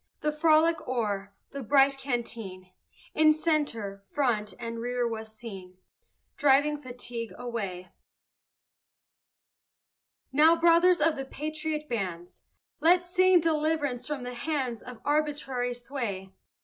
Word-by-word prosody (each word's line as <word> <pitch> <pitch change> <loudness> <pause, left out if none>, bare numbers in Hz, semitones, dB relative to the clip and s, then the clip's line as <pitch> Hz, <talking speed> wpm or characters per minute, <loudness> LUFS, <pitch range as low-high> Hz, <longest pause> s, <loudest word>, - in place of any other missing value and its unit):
The 300 - +1
frolic 315 +1 +3
o'er, 205 -5 -2 0.2
the 280 - -6
bright 275 +2 +3
canteen, 225 -8 -5 0.4
In 310 0 +5
centre, 285 -11 -1
front, 220 -5 -1
and 230 -1 -5
rear 245 0 -1
was 220 -1 -5
seen 195 -5 -10 0.6
Driving 290 +1 +4
fatigue 245 -4 -7
away. 200 -7 -5 2.4
Now, 310 +4 +6
brothers 340 +2 +5
of 320 0 +3
the 270 - -4
patriot 305 +2 -4
bands, 180 - -4 0.4
Let's 355 +1 +3
sing 370 -1 +5
deliverance 305 -5 0
from 290 -4 -4
the 250 0 -5
hands 255 -3 -2
Of 245 -2 -10
arbitrary 290 -4 0
sway. 235 -7 -5
260 Hz, 110 wpm, -28 LUFS, 230-305 Hz, 2.4 s, Now